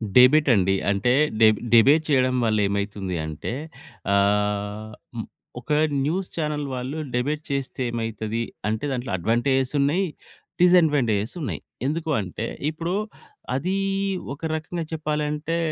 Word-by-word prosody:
Debate 135 +4 +7
అండి. 95 0 +2 0.2
అంటే 100 +5 +2 0.3
డెబ్ 110 -2 +6
debate 140 +7 +6
చేయడం 130 -2 +3
వల్ల 110 -1 +2
ఏమైతుంది 100 -2 -2
అంటే 80 +8 -5 0.6
ఆహ్, 105 +1 +1 0.7
ఒక - - -28 0.4
న్యూస్ 180 +5 -1
చానెల్ 150 -2 -2
వాళ్ళు 130 +5 -4 0.2
డిబేట్ 145 +5 -1
చేస్తే 135 -1 -3
ఏమైతది 115 0 -3 0.3
అంటే 110 +6 -2
దాంట్లో 125 0 -3
అడ్వాంటేజెస్ 125 - +1
ఉన్నాయి, 170 +8 +2 0.6
డిసడ్వాంటేజెస్ 145 - +3
ఉన్నాయి. 140 - -3 0.3
ఎందుకు 160 +2 -2
అంటే, 95 +4 -5 0.3
ఇప్పుడు 165 +3 -3 0.6
అదీ 185 +8 -1 0.6
ఒక - - -25
రకంగా 165 +1 -4
చెప్పాలంటే 150 +1 -1
130 Hz, 115 wpm, -24 LUFS, 110-150 Hz, 0.7 s, డిబేట్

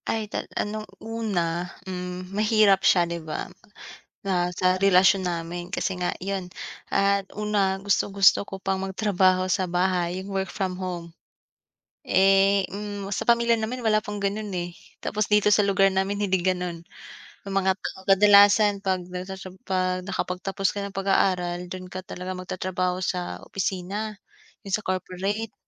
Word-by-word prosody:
Ay, 220 -1 0
tal - - -3
ano, 215 +1 -2 0.2
una, 180 -7 -2 0.2
hmm, 180 0 -6
mahirap 210 -2 +4
siya 175 -2 +4
'di 170 0 -5
ba 155 -1 -4 0.8
na 180 -2 +1
sa 185 +1 +2
relasyon 190 -1 +5
namin. 175 +1 -4
Kasi 190 0 -1
nga, 180 - -1
iyon, 190 -1 -4 0.4
at 200 0 +2
una, 205 -2 +1
gustong-gusto 200 0 +3
ko - - -6
pang 190 0 -2
magtrabaho 190 -1 +2
sa 185 0 +1
bahay, 180 0 0
yung 200 - -8
work 195 0 -1
from 185 -2 -3
home. 175 -2 -5 1.0
Eh, 195 +1 +4
hmm, 205 -1 -5
sa - - -2
pamilya 235 -1 +4
naman 240 +3 -3
wala 215 -1 +4
pang 210 -1 -6
ganun 205 +2 -2
eh. 175 0 -3 0.3
Tapos 215 -1 -1
dito 210 0 +4
sa 210 - +5
lugar 195 0 +4
namin 195 +2 0
hindi 190 -1 +1
ganun, 180 -2 -1 0.7
yung 195 - -4
mga 190 -1 +3 0.3
kadalasan 200 +1 +6
'pag 190 -1 +1
nasa 185 +1 -6
siyu 185 -1 -10
'pag 185 -1 -1
nakapagtapos 190 0 -2
ka 200 - -2
ng 200 - -6
pag-aaral 180 -2 0
dun 185 0 -7
ka 185 0 -7
talaga 185 0 -6
magtatrabaho 185 0 -2
sa 180 -1 -3
opisina, 195 +3 -3 0.5
yung 195 -1 -5
sa 215 - -9
corporate, 190 +4 -3
190 Hz, 150 wpm, -25 LUFS, 180-200 Hz, 1.0 s, kadalasan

